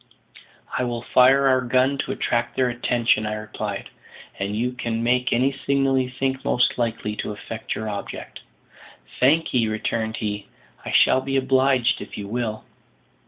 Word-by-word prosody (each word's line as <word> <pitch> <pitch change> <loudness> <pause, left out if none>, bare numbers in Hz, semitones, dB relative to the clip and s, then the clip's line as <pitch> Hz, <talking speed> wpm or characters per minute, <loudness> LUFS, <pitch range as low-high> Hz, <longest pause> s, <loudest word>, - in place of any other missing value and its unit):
"I - - +1
will 120 -1 -3
fire 135 +2 +5
our 130 -1 +4
gun 130 +2 +1
to - - -2
attract 120 0 -1
their 130 -1 +2
attention," 120 -2 +1
I 105 - -2
replied, 105 -2 -5 0.5
"and 100 +1 -2
you 120 +3 0
can 115 -2 -3
make 125 +1 +1
any 130 +3 +3
signal 135 -1 +1
you 130 -1 -1
think 130 +1 -2
most 125 - +2
likely 115 -2 -2
to - - -3
effect 110 +2 -6
your 110 - -4
object." 100 -1 -6 0.8
"Thank 155 +6 +3
'ee," 120 -3 +3
returned 110 +1 -2
he; 105 -2 -4 0.4
"I - - -6
shall 130 - +5
be 135 +1 -1
obliged 130 -1 +2
if - - -8
you 100 - -5
will." 110 0 -3
120 Hz, 165 wpm, -23 LUFS, 110-130 Hz, 0.8 s, fire